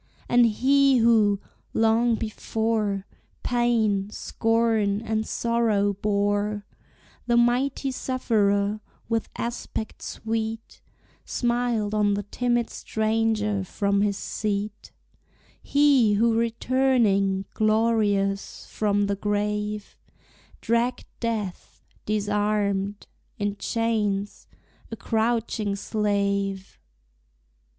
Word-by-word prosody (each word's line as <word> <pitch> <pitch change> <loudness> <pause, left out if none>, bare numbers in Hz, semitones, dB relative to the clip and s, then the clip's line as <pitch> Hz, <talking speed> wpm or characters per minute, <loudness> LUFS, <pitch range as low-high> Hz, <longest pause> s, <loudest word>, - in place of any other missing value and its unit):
And 240 -1 +5
He 270 +4 +3
who, 220 -4 +4 0.4
long 225 +1 +3
before, 215 -2 -2 0.4
Pain, 225 -5 +1
scorn, 225 -2 0
and 220 -1 -2
sorrow 225 -4 +1
bore, 205 +1 0 0.6
The 240 -1 +3
Mighty 255 +3 +2
Sufferer, 210 -6 0 0.3
with 225 -1 -1
aspect 235 -2 -5
sweet, 225 0 -4 0.4
Smiled 240 -3 -1
on 205 -1 +2
the 205 - -3
timid 240 +3 -1
stranger 220 -2 0
from 200 +1 0
his 200 -1 +1
seat; 210 0 -3 0.7
He 280 -7 +4
who 225 +3 +3
returning, 230 -4 +1
glorious, 215 -3 +1
from 205 -1 +1
the 200 0 -1
grave, 210 +1 -2 0.6
Dragged 235 +2 0
Death, 220 -6 -4 0.2
disarmed, 205 -1 0 0.3
in 205 -1 -2
chains, 210 -4 -1 0.4
a 225 - -5
crouching 225 -2 -1
slave. 200 -2 -1
215 Hz, 85 wpm, -25 LUFS, 205-230 Hz, 0.7 s, And